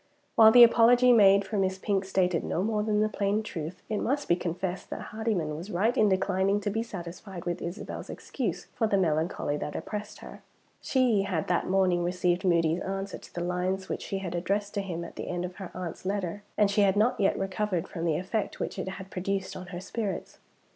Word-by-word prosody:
While 220 Hz, -1 st, +8 dB
the 245 Hz, +1 st, +10 dB
apology 245 Hz, +2 st, +6 dB
made 200 Hz, -3 st, +6 dB
for 205 Hz, +1 st, -2 dB
Miss 190 Hz, 0 st, 0 dB
Pink 195 Hz, 0 st, -1 dB
stated 185 Hz, -3 st, +1 dB
no 180 Hz, -, -1 dB
more 215 Hz, 0 st, 0 dB
than 210 Hz, 0 st, +1 dB
the 215 Hz, -, +3 dB
plain 205 Hz, 0 st, 0 dB
truth, 165 Hz, -3 st, -6 dB
it 215 Hz, -2 st, -1 dB
must 285 Hz, +3 st, -1 dB
be 175 Hz, -, +4 dB
confessed 180 Hz, +1 st, -4 dB
that -, -, -6 dB
Hardyman 210 Hz, -9 st, -1 dB
was 170 Hz, +6 st, -7 dB
right 215 Hz, +5 st, +1 dB
in 215 Hz, -1 st, +4 dB
declining 190 Hz, +1 st, +1 dB
to 205 Hz, -, -1 dB
be 225 Hz, +2 st, -1 dB
satisfied 185 Hz, -3 st, -8 dB
with 175 Hz, 0 st, -2 dB
Isabel's 175 Hz, +4 st, -6 dB
excuse -, -, -4 dB
for 225 Hz, -, +1 dB
the 200 Hz, -, +2 dB
melancholy 160 Hz, -3 st, 0 dB
that 150 Hz, -, -5 dB
oppressed 210 Hz, 0 st, -5 dB
her. -, -, -11 dB, 0.4 s
She 250 Hz, -6 st, +2 dB
had 185 Hz, -5 st, -2 dB
that 175 Hz, -, +1 dB
morning 185 Hz, -2 st, +2 dB
received 180 Hz, +1 st, 0 dB
Moody's 170 Hz, -2 st, +2 dB
answer 195 Hz, 0 st, -4 dB
to -, -, -15 dB
the 175 Hz, -, -2 dB
lines 180 Hz, +2 st, -2 dB
which -, -, -3 dB
she 195 Hz, -, -3 dB
had 190 Hz, -3 st, -5 dB
addressed 200 Hz, +4 st, -1 dB
to 200 Hz, -, -1 dB
him 170 Hz, -3 st, -4 dB
at -, -, -11 dB
the -, -, -5 dB
end 175 Hz, 0 st, -2 dB
of 180 Hz, 0 st, -8 dB
her 190 Hz, -3 st, -7 dB
aunt's 180 Hz, -3 st, -6 dB
letter; 195 Hz, 0 st, -2 dB, 0.2 s
and 205 Hz, -2 st, +4 dB
she 205 Hz, -, +3 dB
had 195 Hz, -1 st, +4 dB
not 220 Hz, +4 st, +2 dB
yet 195 Hz, -, +2 dB
recovered 195 Hz, -2 st, -1 dB
from 165 Hz, -, -6 dB
the 160 Hz, -3 st, +1 dB
effect 195 Hz, +4 st, -3 dB
which -, -, -4 dB
it 190 Hz, -, -3 dB
had 190 Hz, 0 st, -7 dB
produced 190 Hz, +1 st, -2 dB
on 185 Hz, 0 st, -8 dB
her 175 Hz, -, -6 dB
spirits. 195 Hz, 0 st, -4 dB
190 Hz, 215 wpm, -28 LUFS, 180-210 Hz, 0.4 s, the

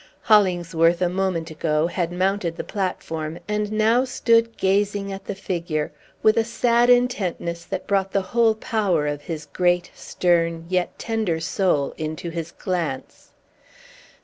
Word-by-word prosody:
Hollingsworth, 175 Hz, -5 st, +3 dB
a 180 Hz, -1 st, +2 dB
moment 180 Hz, -3 st, -1 dB
ago, 155 Hz, 0 st, 0 dB
had 175 Hz, 0 st, -2 dB
mounted 185 Hz, -1 st, 0 dB
the -, -, -3 dB
platform, 165 Hz, -5 st, -3 dB
and 210 Hz, 0 st, -1 dB
now 220 Hz, +3 st, +3 dB
stood 230 Hz, -3 st, +2 dB
gazing 200 Hz, +1 st, 0 dB
at 195 Hz, -, -8 dB
the 205 Hz, -, -4 dB
figure, 170 Hz, -5 st, -3 dB, 0.3 s
with 215 Hz, +1 st, +5 dB
a 230 Hz, -, +4 dB
sad 235 Hz, +1 st, +2 dB
intentness 190 Hz, -9 st, +1 dB
that 190 Hz, +1 st, -4 dB
brought 195 Hz, -1 st, 0 dB
the 195 Hz, -, +1 dB
whole 230 Hz, -2 st, +4 dB
power 200 Hz, -8 st, 0 dB
of 145 Hz, 0 st, -2 dB
his 155 Hz, -1 st, -6 dB
great, 175 Hz, +3 st, 0 dB
stern, 170 Hz, -2 st, 0 dB
yet 180 Hz, -1 st, -1 dB
tender 220 Hz, -8 st, -1 dB
soul 165 Hz, -4 st, 0 dB
into 155 Hz, +2 st, -4 dB
his 165 Hz, 0 st, -5 dB
glance. 170 Hz, -9 st, -4 dB
185 Hz, 145 wpm, -23 LUFS, 165-210 Hz, 0.3 s, with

